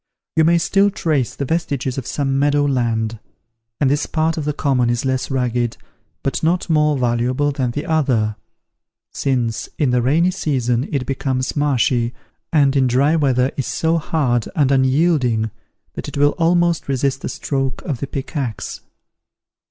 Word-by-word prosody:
You 160 - +4
may 170 +1 +4
still 195 +4 +3
trace 155 - -1
the 140 - -3
vestiges 140 -4 -1
of 125 - -8
some 135 -2 -1
meadow 145 0 +2
land; 115 -4 0 0.6
and 145 - +3
this 145 +2 +1
part 160 0 0
of 155 - -3
the 150 - +1
common 135 -4 +1
is 120 +2 -1
less 130 -1 -1
rugged, 125 -3 -1 0.5
but 135 - -1
not 170 +2 +1
more 150 -2 +3
valuable 125 +3 +1
than 135 -3 -1
the 145 +5 -4
other; 125 -9 +1 0.8
since 120 -4 -1
in 145 -5 +2
the 125 0 +2
rainy 160 +9 +3
season 130 -8 -1
it 135 -3 -1
becomes 130 -1 -2
marshy, 125 -5 +1 0.4
and 145 -3 +3
in 135 -2 +3
dry 135 +6 +3
weather 130 -4 +2
is 135 - -2
so 165 +1 +1
hard 130 -8 0
and 140 -4 +3
unyielding, 130 -5 +2 0.4
that - - -6
it - - -6
will 145 +1 +4
almost 170 0 +2
resist 135 0 0
the - - -4
stroke 135 -2 -3
of 135 -5 -3
the 140 - -3
pickaxe. 135 - -4
135 Hz, 160 wpm, -19 LUFS, 125-150 Hz, 0.8 s, You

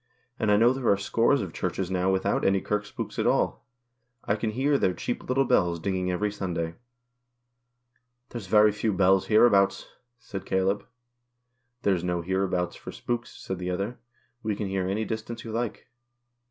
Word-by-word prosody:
And 110 - +1
I 105 - +5
know 120 +4 +5
there 130 -2 -1
are 100 - +4
scores 115 +6 +2
of 90 - -7
Churches 95 -1 -2
now 95 0 +1
without 95 0 +1
any 95 0 +3
kirk 105 +2 -2
spooks - - -6
at - - +2
all. - - +1 0.6
I 100 - +1
can 110 +1 -2
hear 135 +5 +1
their 90 - +1
cheap 120 - -4
little 135 +1 +3
bells 85 -7 +2
dinging 95 +1 -1
every 100 +3 0
Sunday." 85 -5 -3 0.8
" 125 0 -49
There's 115 -6 -7
very 105 +2 +6
few 105 +1 -1
bells 95 0 +3
hereabouts," 100 -3 +4 0.3
said 95 -5 -7
Caleb. 95 +2 0 0.5
" 125 0 -50
There's 95 -4 +2
no 90 -1 -1
hereabouts 95 0 -1
for - - -9
spooks," 120 -1 -3
said 95 -1 -6
the 90 0 -3
other. 100 +7 -3 0.2
" 120 -1 -42
We 110 -2 -1
can 105 - -3
hear 95 -1 -1
any 105 +3 -1
distance 115 +1 -5
you 115 - -6
like." 115 +1 -3
105 Hz, 180 wpm, -27 LUFS, 95-120 Hz, 0.8 s, very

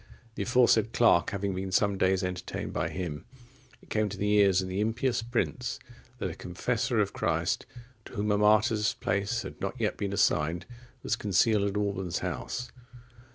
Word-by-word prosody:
The - - -5
aforesaid 120 -3 +3
clerk 115 -7 +4
having 100 -1 -2
been 95 0 -4
some 100 +2 +2
days 95 0 +2
entertained 90 0 -4
by - - -1
him, 85 -5 -5 0.6
it - - -21
came 110 -1 +1
to 100 - -7
the 105 +1 0
ears 100 -3 +5
of 95 - -2
the 95 +1 -3
impious 115 +3 0
prince, 120 +1 -2 0.4
that 95 -7 -3
a - - -7
confessor 90 +1 -1
of - - +1
Christ, - - -1 0.4
to - - -12
whom 105 -2 -1
a 105 - +3
martyr's 105 0 +3
place 100 +5 -1
had - - -9
not 130 - -3
yet 110 -2 0
been 100 -1 -2
assigned, 85 -3 +1 0.4
was - - +1
concealed 105 0 +2
at 100 - -3
Alban's 95 -4 -1
house. 125 - -4
100 Hz, 175 wpm, -29 LUFS, 95-110 Hz, 0.6 s, ears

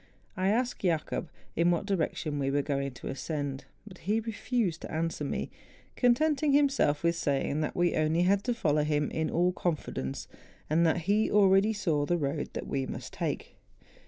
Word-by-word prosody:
I 185 +1 0
asked 245 +4 0
Jacob 165 -1 -1 0.3
in 170 +1 +3
what 175 +2 +1
direction 160 -6 -1
we 135 -1 0
were 140 +1 +1
going 140 -1 -1
to 120 - -9
ascend, 140 -1 -4 0.2
but 185 -4 -12
he 210 +5 0
refused 225 -5 -2
to - - -7
answer 160 -1 -2
me, 140 - -3 0.4
con¬ 245 -2 +4
tenting 300 0 +1
himself 275 - +3
with 170 0 +2
saying 145 0 0
that 155 - -2
we 175 0 +2
had 155 - +1
only 160 +3 +2
to 240 +5 -2
follow 150 -8 +2
him 150 -1 0
in 160 -1 -1
all 175 +2 +2
confidence, 155 - -3 0.4
and 165 +2 +4
that 165 +2 +1
he 205 +6 +2
already 200 +1 +5
saw 160 -9 0
the 175 - +2
road 145 -1 -2
which - - -3
we 135 -1 -2
must - - -7
take. - - -4
170 Hz, 185 wpm, -29 LUFS, 150-205 Hz, 0.4 s, already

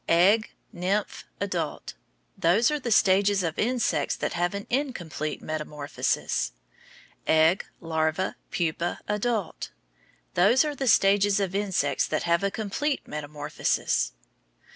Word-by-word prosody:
Egg, 195 +6 +4 0.2
nymph, 195 +4 -2
adult, - - -3 0.4
those 205 - +3
are 300 - 0
the 255 - -4
stages 200 -1 +4
of 165 -2 -3
insects 245 +1 +1
that - - -3
have 175 +3 0
an 200 - -5
incomplete 180 - -2
metamorphosis. 150 - -2 0.7
Egg, 160 +4 +4
larva, 160 +2 -1
pupa, 170 0 -1
adult, 210 -1 -2 0.6
those 205 - +4
are 300 - -2
the 270 -1 -3
stages 200 -1 +4
of 190 -2 -1
insects 190 -9 0
that 155 - -1
have 170 +1 +2
a 200 - +2
complete 225 +8 -2
metamorphosis. 150 - -1
190 Hz, 120 wpm, -26 LUFS, 160-210 Hz, 0.7 s, Egg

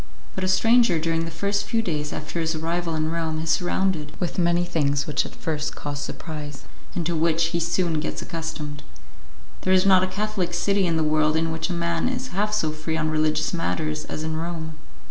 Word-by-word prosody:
But - - -3
a - - +2
stranger 225 0 +5
during 165 +1 0
the - - -4
first 200 +5 0
few 225 +2 +1
days 150 -5 -2
after 155 +3 -4
his 165 0 0
arrival 165 +1 -1
in 155 0 0
Rome 165 -1 -1
is 160 0 0
surrounded 175 -3 0
with 180 +1 -2
many 175 0 +3
things 145 -5 +1
which 150 -2 0
at - - -12
first 155 -2 -2
cause 145 -1 -4
surprise, 150 -2 -6 0.3
and 170 - -1
to 170 +1 0
which 165 +1 +2
he 170 - 0
soon 170 -1 +1
gets 155 - -3
accustomed. 160 -3 -5 0.8
There 185 - +2
is 185 0 +5
not 190 -2 +7
a - - +2
Catholic 190 -2 -1
city 200 +1 +2
in 165 -1 +1
the 160 - +2
world 155 0 +3
in 165 0 +1
which 160 +3 -2
a - - -1
man 170 +4 0
is 255 0 -3
half 210 +3 0
so 185 -7 +1
free 155 +1 -3
on 155 -1 0
religious 155 +1 +1
matters 155 -2 -1
as 155 - -4
in 160 0 -2
Rome. 160 -1 -3
165 Hz, 210 wpm, -25 LUFS, 155-180 Hz, 0.8 s, not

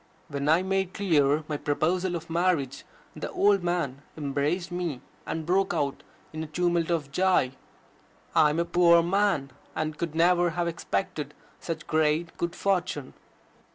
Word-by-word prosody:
When 140 0 -2
I 165 +4 +4
made 190 -1 -1
clear 155 -6 +2
my 150 - -2
proposal 170 +5 0
of 165 0 -6
marriage, 165 -6 0 0.3
the - - -5
old 200 -1 +3
man 170 -6 -1 0.2
embraced 150 +5 -1
me, 175 -7 -3 0.3
and 160 -1 -3
broke 185 +1 +1
out 140 -3 -1 0.3
in 155 0 -4
a - - -6
tumult 175 +1 0
of 155 -5 -1
joy: 180 -6 +2 0.8
"I 150 - +5
am 150 - -1
a 170 - +1
poor 170 -1 +5
man, 185 -6 +1 0.2
and 155 -1 -3
could 165 -2 -3
never 175 +1 +4
have 175 -1 +1
expected 160 -3 -3 0.2
such 165 -2 -5
great 160 +1 +1
good 170 0 -2
fortune." 180 -8 -1
170 Hz, 155 wpm, -27 LUFS, 150-180 Hz, 0.8 s, I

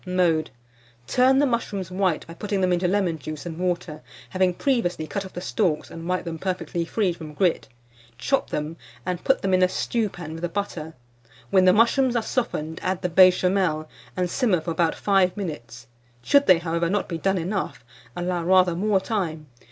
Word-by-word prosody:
Mode. 180 -4 +1 0.6
Turn 255 - +4
the 290 - +4
mushrooms 205 -7 -2
white 185 -3 0
by 165 - -10
putting 200 +3 -3
them 180 -1 +2
into 180 +1 +1
lemon 180 -4 0
juice 155 +3 -7
and 165 -1 -6
water, 175 -4 -2 0.3
having 185 -1 +2
previously 180 - 0
cut 200 +4 -4
off 190 - -11
the 180 - -6
stalks 180 -5 -1
and 165 +1 -7
wiped 185 0 -1
them 165 -1 -5
perfectly 175 -2 -2
free 190 0 0
from 155 -3 -10
grit. 180 0 +1 0.5
Chop 275 - 0
them, 150 +2 -4 0.3
and 180 -1 -3
put 270 - +2
them 190 -1 +1
in 185 - +4
a 185 - +4
stewpan 185 -8 -2
with 165 - -7
the 175 - -2
butter. 165 -4 -4 0.6
When 190 -2 +5
the 185 - +7
mushrooms 240 +4 +3
are 235 - +1
softened, 160 -12 -2
add 185 +1 -2
the 180 - 0
Béchamel, 180 -2 +4 0.3
and 180 -1 +1
simmer 205 -2 +1
for 165 - -4
about 165 0 +1
5 195 -1 +2
minutes; 125 - -6 0.4
should 280 - +4
they, 185 - +7
however, 170 0 -1
not 205 +2 0
be 165 -2 -4
done 195 +3 +1
enough, 185 - -3 0.3
allow 175 -1 -2
rather 180 0 +4
more 200 +2 +2
time. 180 -7 -3
180 Hz, 190 wpm, -24 LUFS, 165-195 Hz, 0.6 s, the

